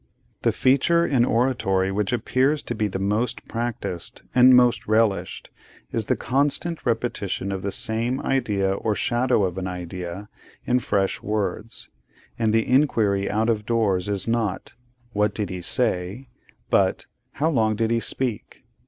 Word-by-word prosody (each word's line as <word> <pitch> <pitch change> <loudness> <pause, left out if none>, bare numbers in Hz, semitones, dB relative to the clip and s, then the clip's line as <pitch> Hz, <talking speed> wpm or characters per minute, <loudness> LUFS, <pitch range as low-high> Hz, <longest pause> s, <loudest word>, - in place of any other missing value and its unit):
The - - +2
feature 155 +6 +3
in 130 -7 +2
oratory 115 -7 +1
which 105 +2 -1
appears 130 +5 +1
to - - -3
be 110 -2 0
the 95 - -4
most 105 +5 -1
practised, 115 -7 -4
and 125 0 +7
most 125 -1 +3
relished, 110 -2 0 0.4
is - - -1
the - - +1
constant 145 +6 -1
repetition 110 -4 -2
of 95 -1 -3
the 100 - -3
same 115 +6 0
idea 105 -7 0
or 105 +2 -1
shadow 120 -1 +1
of 95 0 -2
an 95 - -3
idea 90 +2 -6 0.4
in 125 +1 +2
fresh 100 -5 -1
words; 105 +2 -3 0.5
and 110 -2 +2
the 115 0 +1
inquiry 110 -8 +2
out 110 +2 0
of 110 -2 -1
doors 105 -5 +1
is 100 -1 -1
not, 115 -5 -1 0.4
'What 105 0 +1
did 105 -4 -3
he 90 -1 -5
say?' 110 +2 -1 0.4
but, - - +2 0.3
'How 155 +4 0
long 110 -6 +2
did 115 +1 0
he 115 - +2
speak? 120 -2 -3
110 Hz, 155 wpm, -23 LUFS, 100-125 Hz, 0.5 s, and